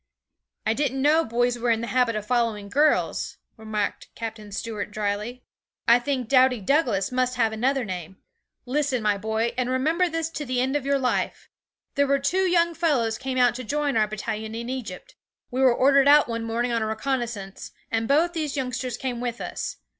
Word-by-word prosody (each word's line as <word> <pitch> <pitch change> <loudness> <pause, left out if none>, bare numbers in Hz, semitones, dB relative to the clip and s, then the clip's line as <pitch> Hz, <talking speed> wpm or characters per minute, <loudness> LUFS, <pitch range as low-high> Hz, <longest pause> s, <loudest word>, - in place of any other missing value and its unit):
'I 220 - +2
didn't 270 0 -1
know 310 +3 +4
boys 245 0 0
were 240 +1 0
in 225 -1 +2
the - - -2
habit 245 -2 +1
of 210 -1 -3
following 230 -4 0
girls,' 295 +7 +1 0.2
remarked 215 -2 -3
Captain 220 -2 -6
Stuart 210 0 -4
drily. 210 +4 -3 0.4
'I 235 +1 +7
think 255 -2 -2
doughty 255 -1 +4
Douglas 220 - +1
must 255 0 0
have 225 -3 +2
another 255 +3 0
name. 185 -2 -6 0.5
Listen, 260 -2 0
my 205 -1 +1
boy, 220 +2 -1
and 250 0 0
remember 320 +8 +1
this 325 0 -2
to 305 - -4
the 255 -2 -1
end 260 +3 0
of 280 -2 -1
your 280 0 +3
life. 255 -2 -2 0.4
There 285 0 +2
were 280 0 +3
two 370 +7 +1
young 340 -1 +3
fellows 275 -10 +1
came 260 -1 -3
out 245 -1 +4
to 255 +1 -6
join 290 +2 -1
our 215 -1 +3
battalion 215 +1 -4
in 235 +1 -5
Egypt. 265 - -6 0.4
We 255 +2 -1
were 260 -1 +6
ordered 275 +3 +4
out 295 +1 +7
one 230 -1 -3
morning 235 +2 -1
on 230 -1 0
a 220 - 0
reconnaissance, 220 -4 -3 0.2
and 225 0 0
both 320 +6 +3
these 305 -4 -3
youngsters 255 -1 -3
came 245 -2 -3
with 240 -1 -3
us. - - -5
245 Hz, 190 wpm, -25 LUFS, 225-275 Hz, 0.5 s, I